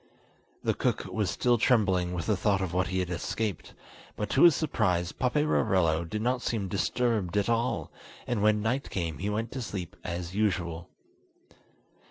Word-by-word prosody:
The - - +2
cook - - -1
was 105 -4 -1
still 120 +2 +2
trembling 95 -7 +3
with 85 -2 -3
the 105 - +2
thought 100 0 +1
of 95 -3 -3
what 95 +1 +1
he 95 +2 -2
had 90 -1 -3
escaped, 95 +2 -3 0.4
but 105 - -3
to 135 - +3
his 170 -3 +8
surprise 90 - 0
Paperarello 95 - +1
did 105 +6 -4
not 125 +1 +1
seem 110 -6 -2
disturbed 105 -1 0
at 100 +2 +1
all, 115 +2 0 0.3
and 120 -4 -1
when 105 0 +3
night 125 +5 -1
came 85 -4 -3
he 100 +3 -2
went 110 +3 -2
to 130 - -4
sleep 95 -6 -5
as 85 +1 -4
usual. 90 -5 -1
100 Hz, 170 wpm, -28 LUFS, 90-115 Hz, 0.4 s, his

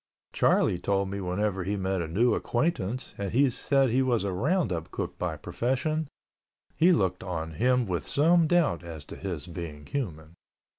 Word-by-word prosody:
Charlie 90 - +3
told 100 +1 0
me 100 0 -3
whenever 95 +1 -1
he 100 +3 -1
met 95 -1 -1
a 85 - -3
new 110 +9 +2
acquaintance 125 - -1
and 100 -1 -2
he 135 +2 +4
said 135 0 +2
he 130 +3 +3
was 125 -4 +1
a 100 -2 -1
roundup 95 - 0
cook - - -5
by - - -2
profession, 150 +5 -1 0.7
he 170 +3 +5
looked 95 - +1
on 80 -3 -4
him 125 +8 +2
with 85 -7 -3
some 165 +3 +4
doubt 165 - +2
as 80 -4 -8
to - - -9
his 85 -7 -5
being 85 -4 -7
human. 85 - -4
100 Hz, 170 wpm, -28 LUFS, 90-130 Hz, 0.7 s, he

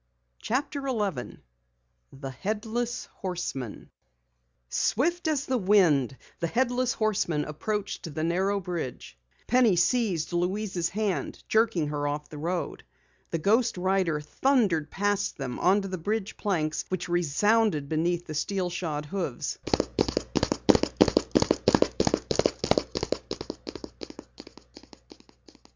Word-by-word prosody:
CHAPTER 275 +3 -2
11 205 - -2 0.7
THE 135 0 -7
HEADLESS 220 - -3
HORSEMAN 175 - -4 0.8
Swift 330 - +1
as 295 -2 +1
the 260 -1 0
wind, 170 - +4 0.2
the 170 - 0
headless 250 +5 +1
horseman 190 -8 0
approached 195 +2 -3
the 155 - -1
narrow 190 +4 +1
bridge. 170 - -5 0.3
Penny 240 -5 +4
seized 180 -4 +1
Louise's 180 0 0
hand, 210 -2 -2
jerking 220 -9 +2
her 145 -1 -1
off 150 +1 -3
the 150 - -8
road. 170 +3 -3 0.5
The 165 - -1
ghost 220 +6 +2
rider 185 -4 +1
thundered 180 - +1
past 205 0 0
them 130 -3 -4
onto 195 +2 +3
the 185 -2 -4
bridge 210 +4 -2
planks 160 -6 -1
which 185 -1 -2
resounded 175 0 +2
beneath 170 +3 0
the 155 - -6
steel 180 +4 -1
shod 155 -4 -3
hoofs. 170 -6 -3
185 Hz, 100 wpm, -28 LUFS, 155-215 Hz, 0.8 s, wind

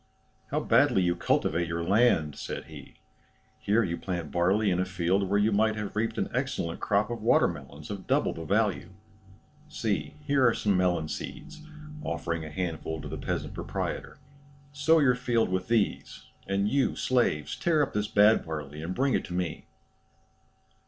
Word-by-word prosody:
"How - - -1
badly 95 - +3
you 90 0 +1
cultivate 85 0 0
your 85 0 -2
land," 95 -6 +3
said - - -5
he. - - -12 0.6
"Here 110 +3 +2
you 85 -3 -2
plant 85 -5 -4
barley 95 +4 +2
in 90 - +1
a - - +2
field 95 +1 0
where 100 - +2
you 105 +2 +3
might 110 +1 +2
have 105 -1 -5
reaped 110 +1 -1
an - - 0
excellent 125 -10 -2
crop 105 +3 +1
of 120 - -4
water - - +4
melons 70 +5 -8
of 100 -2 -7
double - - +2
the 80 - -7
value. 100 0 0 0.8
See, 95 -10 -2
here 140 -2 +2
are 115 - +3
some 100 -2 +1
melon 90 -3 +1
seeds 155 - -7 0.4
(offering 85 -1 -3
a 80 - -7
handful 80 -2 -4
to - - -7
the - - -5
peasant - - -3
proprietor); - - -4 0.6
sow 150 +3 +4
your 140 -5 +4
field 120 -2 0
with 95 0 -2
these; 115 -3 -1 0.2
and 100 +1 +1
you, 135 +3 +1
slaves, 75 - 0
tear 160 -3 +2
up 140 - -4
this 105 0 0
bad 105 +2 +5
barley 75 -2 -6
and 90 +3 -4
bring 135 0 +1
it - - +1
to - - -8
me." 90 -3 -3
100 Hz, 175 wpm, -28 LUFS, 85-115 Hz, 0.8 s, bad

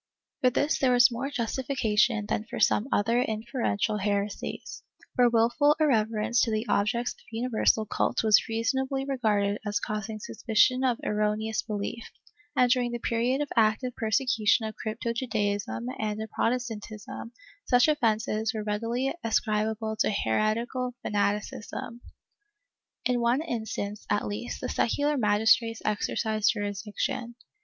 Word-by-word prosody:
For 255 - +5
this 290 +5 0
there 260 -2 +3
was 245 0 +6
more 250 +4 -3
justification 235 -4 0
than 210 - -2
for - - -6
some 215 - +3
other 230 +4 +2
inferential 220 -2 -1
heresies, 200 0 -3 0.3
for 245 -1 +5
wilful 240 +6 +3
irreverence 230 -5 +2
to 230 - +1
the 215 +1 -1
objects 235 +4 +1
of - - -26
universal 225 -1 +1
cult 210 - 0
was 215 -2 +5
reasonably 265 +4 -1
regarded 210 -6 0
as 205 -1 -1
causing 215 +1 -4
suspicion 250 +4 +2
of 250 -3 +2
erroneous 210 +1 0
belief, 215 +2 -4 0.5
and 250 -2 +4
during 245 -2 +2
the - - -1
period 240 +4 0
of 290 - -2
active 230 +2 +2
persecution 225 -1 +2
of 215 - -5
crypto 230 +1 -3
Judaism 205 - -2
and 215 -1 -2
of 220 0 -6
Protestantism 225 -2 -3 0.3
such 245 +1 +4
offences 220 -5 +1
were 215 - -2
readily 230 +5 -1
ascribable 220 0 0
to - - +2
heretical 225 - 0
fanaticism. 210 +3 -2 1.0
In 250 -1 +2
one 240 +5 +2
instance, 220 -6 -4
at 205 - +1
least, 105 +3 -5
the - - -3
secular 290 +5 +1
magistrates 225 0 +3
exercised 215 0 +1
jurisdiction. 210 +3 -3
225 Hz, 130 wpm, -27 LUFS, 210-245 Hz, 1.0 s, was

